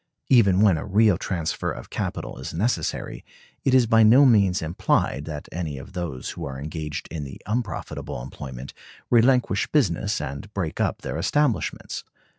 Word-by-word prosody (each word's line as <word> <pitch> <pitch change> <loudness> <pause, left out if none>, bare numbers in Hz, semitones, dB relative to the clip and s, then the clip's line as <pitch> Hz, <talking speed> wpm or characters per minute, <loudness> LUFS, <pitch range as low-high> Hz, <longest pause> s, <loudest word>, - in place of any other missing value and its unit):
Even 100 -7 +5
when 95 -6 +5
a - - -5
real 105 0 +4
transfer 85 -2 -2
of - - -9
capital - - -4
is - - -6
necessary, 110 +8 -2 0.4
it 130 - +3
is 125 -2 +6
by 115 0 +4
no 120 +6 +7
means 100 -8 +4
implied 80 -3 0
that 75 -2 -6
any 80 -4 -4
of 65 - -10
those 85 -8 -4
who - - -7
are 65 -1 -5
engaged 75 +1 -5
in 80 -3 -4
the 70 - -8
unprofitable 105 - -3
employment 65 0 -8 0.4
relinquish 120 -3 +3
business 100 - +1
and 70 +7 -6
break 85 -7 -3
up - - -1
their 80 - -3
establishments. 140 - 0
90 Hz, 160 wpm, -24 LUFS, 75-115 Hz, 0.4 s, no